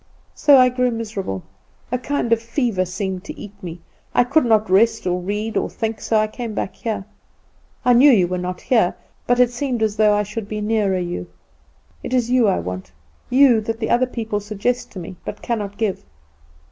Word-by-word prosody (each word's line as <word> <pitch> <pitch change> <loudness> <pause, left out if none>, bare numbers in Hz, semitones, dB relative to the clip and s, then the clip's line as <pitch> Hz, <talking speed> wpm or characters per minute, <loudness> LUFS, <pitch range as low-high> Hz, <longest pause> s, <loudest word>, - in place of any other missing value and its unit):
So 285 -2 +6
I 255 -1 +6
grew 250 0 +1
miserable; 210 - -4 0.5
a 250 - 0
kind 255 -2 0
of 230 - +1
fever 230 -5 0
seemed 185 0 -4
to - - -8
eat 205 - -9
me; 170 -1 -7 0.3
I - - +6
could 280 +4 +2
not 220 -2 +3
rest, 225 +4 +3
or 180 0 0
read, 210 +4 -3
or - - 0
think; 225 -1 -4
so 225 - +1
I 215 - +3
came 220 0 -6
back 190 - -3
here. 220 -4 -4 0.8
I 250 - +6
knew 260 +5 +7
you 195 -9 +5
were 180 +1 -2
not 180 0 -4
here 225 -8 +2 0.3
but 245 0 +3
it 250 -1 +5
seemed 245 -2 -2
as 215 -1 0
though 210 -1 +4
I 210 - +1
should 210 +1 -6
be 215 - -3
nearer 210 -3 +1
you; 175 -1 -4 0.7
and - - -5
it - - +2
is 245 -1 +1
you 250 -3 +4
I 195 - +2
want 90 +2 -5 0.4
you 250 -3 +5
that 225 +1 -4
the 220 - -2
other 245 +2 +3
people 225 -4 -3
suggest 210 +4 -2
to 190 - -6
me, 180 +1 -8
but 210 - -7
cannot 205 -4 -3
give." 215 -4 -1
220 Hz, 210 wpm, -21 LUFS, 195-240 Hz, 0.8 s, knew